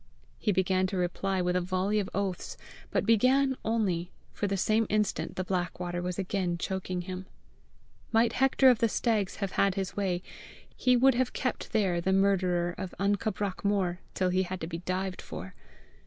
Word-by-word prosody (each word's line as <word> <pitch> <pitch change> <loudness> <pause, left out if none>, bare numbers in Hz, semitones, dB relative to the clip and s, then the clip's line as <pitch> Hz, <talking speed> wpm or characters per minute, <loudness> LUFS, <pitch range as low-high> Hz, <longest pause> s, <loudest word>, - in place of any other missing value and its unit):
He 210 - +1
began 185 0 +2
to 190 - -3
reply 185 +1 0
with 180 0 0
a 180 - +2
volley 185 +4 0
of 195 - -2
oaths, 195 -2 -3 0.3
but - - 0
began 260 +4 +4
only, 190 -6 0 0.2
for 205 - -1
the 195 0 -1
same 215 +3 +2
instant 210 -1 0
the 185 - -1
black 180 -1 -2
water 175 -1 -3
was 180 0 -3
again 185 -2 -1
choking 185 0 -3
him. 185 +1 -6 0.8
Might 230 +1 +3
Hector 265 0 +5
of 240 - +1
the 230 - +3
Stags 215 -4 0
have 195 -2 -3
had 195 -2 +2
his 190 -2 -3
way, 185 -3 -1 0.5
he 250 -1 +3
would 265 +2 +5
have 250 +1 0
kept 255 - -3
there 190 -6 +1
the 190 +2 +1
murderer 185 -3 +2
of 190 -2 -5
AN 200 +1 +2
CABRACH 205 -2 -3
MOR 190 -3 +1 0.2
till 185 -1 +1
he 185 +1 +2
had 185 0 -3
to - - -2
be 165 0 -5
dived 185 +1 -3
for. 95 +2 -8
190 Hz, 185 wpm, -29 LUFS, 180-210 Hz, 0.8 s, Hector